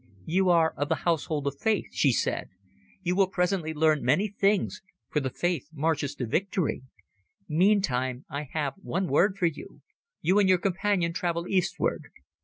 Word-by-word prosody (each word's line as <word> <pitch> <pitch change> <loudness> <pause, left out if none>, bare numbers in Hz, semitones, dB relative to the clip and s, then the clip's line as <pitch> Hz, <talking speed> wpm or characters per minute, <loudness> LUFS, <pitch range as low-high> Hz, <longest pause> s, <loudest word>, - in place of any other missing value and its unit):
"You 185 +3 +2
are 165 -2 +4
of 145 +1 -1
the 160 - -1
Household 155 -3 0
of 140 0 -3
Faith," 220 -3 +1
she 140 - +3
said. 115 - -1 0.5
"You 180 0 0
will 195 0 +4
presently 180 -3 0
learn 155 -1 +2
many 150 - +2
things, 200 0 0 0.3
for 150 - +2
the 135 -2 -2
Faith 170 0 -2
marches 150 -2 -1
to 125 - -3
victory. 180 - -1 0.7
Meantime 150 -8 +1
I 140 -1 -5
have 145 -3 -1
one 190 -1 -2
word 190 +7 +2
for 180 - +1
you. 165 -3 -4 0.4
You 190 +4 +3
and 195 -2 +4
your 185 - +6
companion 185 -1 0
travel 170 -1 -2
eastward." 185 -3 0
170 Hz, 165 wpm, -27 LUFS, 145-190 Hz, 0.7 s, your